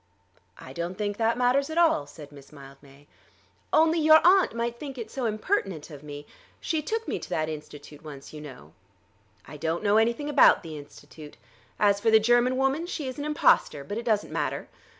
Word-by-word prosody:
"I 130 - -11
don't 170 +4 -5
think 205 -1 -3
that 230 +1 +1
matters 255 +4 +1
at 315 - -5
all," 325 - +3
said 145 0 -12
Miss 140 -1 -15
Mildmay. 140 0 -16 0.7
"Only 325 +1 +3
your 310 0 +7
aunt 370 - +4
might 235 0 -3
think 275 -3 -8
it 225 -2 -7
so 260 -3 -4
impertinent 210 - -2
of 145 -2 -10
me! 145 -1 -9 0.3
She 320 -2 -2
took 450 +8 -4
me - - -2
to - - -10
that 155 0 -1
Institute 150 -1 -10
once, 140 -2 -11
you 150 - -9
know." 125 - -12 0.7
"I 150 - -10
don't 165 +5 -3
know 205 0 +3
anything 235 +6 +1
about 290 -8 +5
the 160 -2 -8
Institute. 145 +1 -13 0.4
As 200 -1 +3
for 225 - +1
the 220 0 +6
German 240 +3 +2
woman, 270 +6 0
she 305 -6 -5
is 255 +2 -6
an 290 - -4
impostor; 295 - +2
but 205 +10 -5
it - - -6
doesn't 215 -3 0
matter. - - -3
210 Hz, 195 wpm, -26 LUFS, -, 0.7 s, your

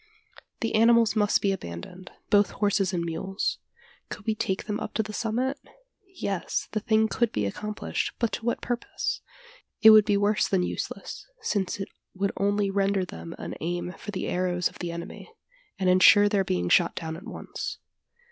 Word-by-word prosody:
The 225 - -1
animals 230 0 +5
must 210 -1 +2
be 200 - +3
abandoned 175 - -7 0.2
both 205 -1 +5
horses 200 -2 +1
and 170 -2 -1
mules. 190 +4 -2 0.5
Could - - -8
we 220 - +1
take 215 -3 -2
them 210 -1 -2
up - - -6
to 220 - +2
the 215 0 -8
summit? 245 +6 -1 0.6
Yes, 195 - -2
the 215 - 0
thing 220 0 +2
could 235 0 0
be 105 - -1
accomplished, 210 - -3
but 235 -2 0
to - - -4
what 235 - 0
purpose? 240 0 -3 0.6
It 220 - +11
would 215 -1 +8
be 205 -2 +2
worse 205 +1 +2
than 190 -2 +1
useless: - - -5 0.2
since 195 -2 -1
it 195 - -4 0.3
would 195 +1 0
only 200 0 +1
render 195 -1 +1
them 85 - -8
an - - -6
aim 175 +2 -3
for - - -10
the 195 -2 -3
arrows 180 -1 0
of - - -16
the 175 -1 -3
enemy, 170 - -8 0.5
and 190 - 0
insure 185 +3 +7
their 205 -2 +2
being 90 - -1
shot 170 - +4
down 160 -2 -4
at 170 - -10
once. - - -6
200 Hz, 180 wpm, -27 LUFS, 180-215 Hz, 0.6 s, It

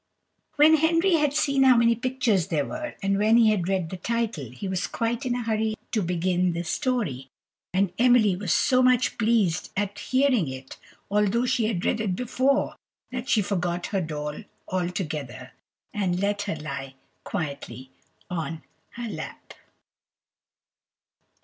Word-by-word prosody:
When 310 +2 +6
Henry 330 +3 +3
had 295 -2 +2
seen 275 -2 +1
how 260 -2 +6
many 235 0 +5
pictures 240 - 0
there 150 -4 0
were, 310 -1 -6
and 195 0 +1
when 220 +2 +4
he 225 -2 +6
had 185 -5 0
read 185 -4 -1
the 185 - -5
title, 225 - -2
he 130 - -7
was 190 0 -1
quite 235 +2 -2
in 245 - 0
a 245 - -2
hurry 220 -1 0 0.2
to 220 - +1
begin 180 0 0
the 170 +1 -3
story, 175 - -2 0.4
and 190 -1 +1
Emily 240 -6 +5
was 185 -2 -3
so 255 +9 +3
much 255 -1 +3
pleased 215 -7 +2
at 205 0 -2
hearing 255 - +2
it, 130 0 -8 0.3
although 210 +4 +2
she 240 -2 +1
had 190 -6 -2
read 220 - +1
it 195 -4 -1
before, 260 +5 0 0.4
that 255 +1 -5
she 215 - +3
forgot 180 -3 -2
her 195 - +2
doll 150 -2 -4 0.3
altogether, 175 - -3 0.4
and 185 -3 0
let 205 +1 0
her 200 -5 -3
lie 140 -3 -6 0.3
quietly 140 - -5 0.4
on 165 -2 -4 0.3
her 240 0 -5
lap. - - -8
205 Hz, 155 wpm, -25 LUFS, 175-245 Hz, 0.4 s, When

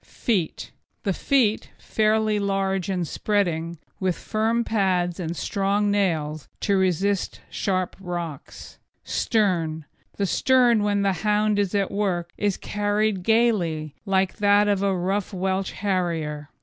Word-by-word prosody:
FEET 195 - -2 0.3
The 195 - 0
feet, 235 -2 +1
fairly 215 -1 +1
large 195 -2 -1
and 180 -3 -1
spreading, 170 -5 -1 0.2
with 185 -2 0
firm 225 +2 0
pads 185 -6 0
and 170 -1 -4
strong 200 +1 0
nails 155 -7 0
to 200 - +2
resist 190 +1 0
sharp 185 -3 -1
rocks. 175 -5 -7 0.2
STERN 170 -8 0 0.3
The 200 - +1
stern 245 +1 +3
when 205 -1 +1
the 195 -1 +2
hound 210 0 +2
is 200 0 0
at 200 -1 +1
work 180 -4 -1
is 205 -2 0
carried 205 -1 0
gaily, 180 -9 +1
like 190 -2 +1
that 205 0 +4
of 200 -2 +1
a 195 -2 +1
rough 195 +3 -1
Welsh 190 +1 -1
Harrier. 165 -7 -2
195 Hz, 130 wpm, -24 LUFS, 175-210 Hz, 0.3 s, that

